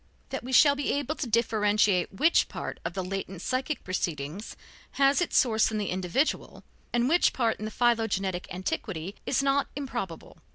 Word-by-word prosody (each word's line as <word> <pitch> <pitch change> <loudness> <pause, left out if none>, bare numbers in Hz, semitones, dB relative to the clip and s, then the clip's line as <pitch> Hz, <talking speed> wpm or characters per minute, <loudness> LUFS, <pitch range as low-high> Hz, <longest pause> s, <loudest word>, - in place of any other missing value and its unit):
That - - -4
we 255 - -6
shall 285 +3 +7
be 285 -1 -1
able 285 +1 -1
to 300 - -4
differentiate 210 -4 +2
which 310 - +3
part - - -6
of - - -4
the 190 - -2
latent 190 -1 -5
psychic 265 +4 -2
proceeding 165 -2 -3 0.5
has 275 +3 +3
its 350 - 0
source 220 -3 +3
in 220 - -3
the 205 -2 -2
individual, 185 - -1 0.3
and 240 +1 +2
which 345 +5 +3
part 230 -3 0
in 215 - -4
the - - -3
philogenetic 210 -6 0
antiquity 185 -1 -4
is 275 - +1
not 275 0 +2
improbable. 240 - -6
220 Hz, 170 wpm, -28 LUFS, 190-270 Hz, 0.5 s, shall